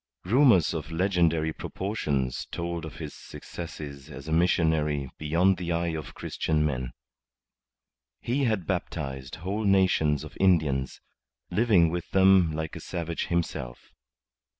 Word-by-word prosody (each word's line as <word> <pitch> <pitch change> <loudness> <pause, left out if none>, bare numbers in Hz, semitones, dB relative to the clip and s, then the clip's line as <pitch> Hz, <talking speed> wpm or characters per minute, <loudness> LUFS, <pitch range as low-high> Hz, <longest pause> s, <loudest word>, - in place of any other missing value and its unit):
Rumours 115 - +5
of 80 -2 -4
legendary 85 -3 +1
proportions 75 - -2
told 85 -1 -3
of 80 - -9
his 75 -3 -7
successes 75 -4 -9
as 70 +1 -9
a - - -4
missionary 80 -5 +2
beyond 85 +5 +2
the 85 -1 -3
eye 85 0 0
of 80 -1 -6
Christian 75 -1 -1
men. 65 -4 -2 1.3
He 135 +3 0
had 110 -7 0
baptized 65 -3 -4
whole 95 +6 -3
nations 95 -7 +3
of - - -10
Indians, 75 -8 +2 0.5
living 100 -8 +4
with 85 0 -4
them 95 -3 +5
like 80 0 -4
a - - -6
savage 85 -2 -4
himself. 80 -8 -3
85 Hz, 125 wpm, -27 LUFS, 75-95 Hz, 1.3 s, Rumours